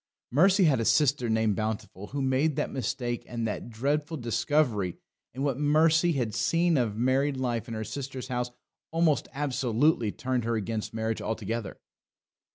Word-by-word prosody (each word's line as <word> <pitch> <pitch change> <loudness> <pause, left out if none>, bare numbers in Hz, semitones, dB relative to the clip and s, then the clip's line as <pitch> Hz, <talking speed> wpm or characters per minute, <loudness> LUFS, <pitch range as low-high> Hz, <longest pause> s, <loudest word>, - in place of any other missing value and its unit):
Mercy 185 - +5
had 145 -7 +4
a - - +1
sister 135 -1 +3
named 110 -2 +2
Bountiful, 110 -2 -4
who 140 +3 -3
made 135 +3 +2
that - - -1
mistake 120 -1 -2
and 115 -1 -3
that 110 - -4
dreadful 145 +7 -1
discovery; 120 - 0 0.3
and 130 +3 -4
what 140 -2 0
Mercy 160 +3 +4
had 120 -6 -1
seen 170 +6 +2
of 115 -6 0
married 130 +3 +1
life 120 -3 -2
in 115 - -5
her 110 - -3
sister's 130 +1 -6
house 125 -1 -1 0.4
almost 165 -2 +2
absolutely 130 -3 +1
turned 130 -2 -2
her 115 +1 0
against 110 0 -3
marriage 110 0 -2
altogether. 110 -1 -3
125 Hz, 160 wpm, -28 LUFS, 115-145 Hz, 0.4 s, Mercy